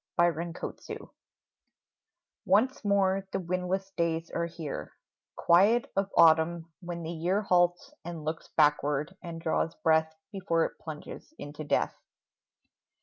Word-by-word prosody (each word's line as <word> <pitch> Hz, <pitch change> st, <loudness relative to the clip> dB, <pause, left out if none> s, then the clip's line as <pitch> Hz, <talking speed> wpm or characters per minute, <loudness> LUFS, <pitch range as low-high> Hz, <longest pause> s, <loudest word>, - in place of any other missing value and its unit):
ANNIVERSARIES 170 Hz, 0 st, -2 dB, 1.3 s
Once 230 Hz, +9 st, +2 dB
more 195 Hz, -1 st, +2 dB
the 195 Hz, -, -1 dB
windless 185 Hz, +2 st, -2 dB
days 165 Hz, -2 st, -1 dB
are 170 Hz, 0 st, -1 dB
here, 165 Hz, -4 st, -6 dB, 0.4 s
Quiet 205 Hz, +8 st, +4 dB
of 195 Hz, 0 st, 0 dB
autumn, 165 Hz, 0 st, +4 dB
when 175 Hz, -2 st, -6 dB
the 160 Hz, -, -4 dB
year 175 Hz, +5 st, 0 dB
Halts 175 Hz, +6 st, +2 dB
and 170 Hz, -3 st, -7 dB
looks 160 Hz, +1 st, -4 dB
backward 150 Hz, +2 st, +2 dB
and 170 Hz, -2 st, -7 dB
draws 160 Hz, 0 st, -1 dB
breath 160 Hz, 0 st, +2 dB, 0.2 s
Before 180 Hz, -5 st, +1 dB
it -, -, -7 dB
plunges 155 Hz, -, -9 dB
into 145 Hz, +1 st, -7 dB
death. 150 Hz, -, 0 dB
170 Hz, 120 wpm, -29 LUFS, 160-190 Hz, 1.3 s, Quiet